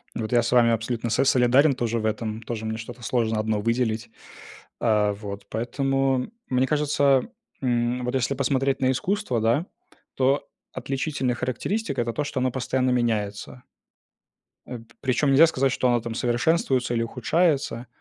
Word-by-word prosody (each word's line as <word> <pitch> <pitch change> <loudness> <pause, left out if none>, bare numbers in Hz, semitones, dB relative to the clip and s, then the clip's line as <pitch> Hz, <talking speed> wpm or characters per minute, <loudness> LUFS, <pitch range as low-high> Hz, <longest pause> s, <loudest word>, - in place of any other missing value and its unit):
Вот 110 0 -4
я 120 -1 +4
с 120 - -2
вами 120 -2 +5
абсолютно 115 +1 -2
с 125 +5 +2
солидарен 130 +3 +4
тоже 120 -2 -2
в 110 - -3
этом, 110 0 -2
тоже 110 -1 -5
мне 110 0 -3
что-то 120 +2 -9
сложно 115 -2 0
одно 110 -1 -1
выделить. 115 0 -1 0.7
А, 105 -3 +2
вот 100 -1 -8
поэтому, 135 - 0 0.2
мне 130 +1 +2
кажется, 145 -3 +2 0.4
м, 120 0 0
вот 125 - -2
если 135 +1 0
посмотреть 135 0 0
на 130 0 +3
искусство, 180 - -1
да, 120 +9 +2 0.5
то 135 +2 +1 0.3
отличительная 135 -2 -2
характеристика- 135 - -2
это 120 -1 -2
то, 150 - -1
что 140 -2 -3
оно 130 - +1
постоянно 130 0 0
меняется. 115 -1 -2 1.0
Э, 125 - -6
п 115 +1 -19
причем 140 +2 +1
нельзя 160 +5 +7
сказать, 135 -3 +1
что 130 - +1
оно 120 -1 +3
там 115 0 -5
совершенствуется 125 +1 +1
или 115 0 +1
ухудшается. 135 0 0
125 Hz, 160 wpm, -24 LUFS, 115-135 Hz, 1.0 s, нельзя